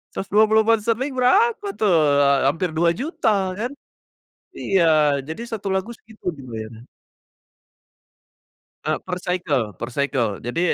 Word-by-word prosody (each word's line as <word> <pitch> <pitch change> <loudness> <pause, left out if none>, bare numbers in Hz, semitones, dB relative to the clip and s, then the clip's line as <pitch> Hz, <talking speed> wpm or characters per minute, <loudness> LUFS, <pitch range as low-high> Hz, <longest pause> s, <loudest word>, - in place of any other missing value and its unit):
£120 220 +5 +2
berapa 415 - +3
tuh, 210 - +2 0.3
eee, 140 -1 +4
hampir 165 +4 -1
Rp2.000.000 170 - 0 0.3
kan. 240 +4 -2 0.9
Iya, 195 -3 +2 0.4
jadi 160 +9 -6
1 210 -3 -4
lagu 190 +5 -2
segitu 220 0 -20
dibayarnya. 115 -3 -8 2.0
Eee, - - 0
per 180 -1 -4
cycle 150 - -2
per 120 - -5
cycle. 130 -7 -1
Jadi 120 +8 -3
185 Hz, 105 wpm, -22 LUFS, 140-225 Hz, 2.0 s, eee